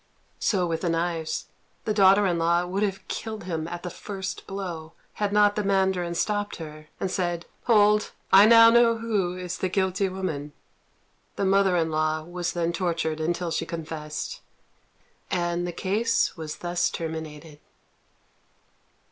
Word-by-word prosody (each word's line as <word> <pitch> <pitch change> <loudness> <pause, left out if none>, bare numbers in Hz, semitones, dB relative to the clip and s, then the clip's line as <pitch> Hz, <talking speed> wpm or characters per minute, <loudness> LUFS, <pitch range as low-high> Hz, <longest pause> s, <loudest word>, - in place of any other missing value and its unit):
So 190 -4 +1
with 165 -1 -2
the 175 - 0
knives: 165 -1 -1 0.4
the 215 - 0
daughter 200 0 +5
in 175 -3 +1
law 170 +1 +2
would 190 +3 -2
have 195 -2 -2
killed 220 -1 -5
him 165 -3 -3
at 175 0 -6
the 180 - -4
first 195 0 -6
blow, 175 -5 -6 0.3
had 205 -1 +1
not 205 0 +4
the 210 - -1
mandarin 190 -3 +1
stopped 205 +3 -1
her, 155 -2 -9
and 190 - -2
said, 175 -3 -2 0.2
"Hold! 210 -2 +4 0.2
I 200 +2 +9
now 230 0 +8
know 235 -1 +5
who 205 -6 -1
is 180 0 -5
the 185 - 0
guilty 190 +1 0
woman." 160 -6 -4 0.8
The 200 - -1
mother 195 -1 +3
in 165 -1 0
law 155 0 0
was 175 +1 -4
then 170 -1 -1
tortured 165 -3 -1
until 170 +2 -1
she - - -1
confessed, 160 - -5 0.9
and 175 -1 -1
the - - -3
case 215 +6 0
was 155 -2 -6
thus 175 0 0
terminated. 160 -2 -6
180 Hz, 155 wpm, -26 LUFS, 165-200 Hz, 0.9 s, I